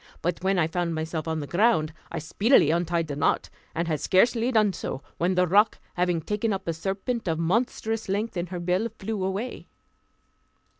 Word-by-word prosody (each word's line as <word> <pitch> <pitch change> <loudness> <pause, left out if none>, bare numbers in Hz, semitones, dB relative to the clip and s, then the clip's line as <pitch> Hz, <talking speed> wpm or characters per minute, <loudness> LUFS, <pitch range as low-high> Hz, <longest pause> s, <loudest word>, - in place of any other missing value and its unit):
But 175 +1 -1
when 190 0 +2
I 165 - +3
found 170 0 -1
myself 160 0 -3
on 160 -1 -1
the - - -4
ground, 165 -3 +2 0.2
I 170 - -3
speedily 165 - +3
untied 170 0 +1
the 145 -2 -5
knot, 145 - +1 0.2
and 170 +1 -1
had 155 -3 0
scarcely 230 - +3
done 215 -4 +3
so, 135 - -5 0.2
when 180 +2 +1
the 180 0 +4
roc, 205 +5 +4 0.2
having 175 -2 +1
taken 210 +6 -1
up 190 -2 -5
a 165 - +1
serpent 195 +7 -3
of 160 -1 +1
a - - -2
monstrous 225 +3 0
length 205 +3 -1
in 175 0 -2
her 180 0 -5
bill, 180 +6 0
flew 210 -1 -3
away. 195 +6 -3
180 Hz, 195 wpm, -26 LUFS, 165-210 Hz, 0.2 s, the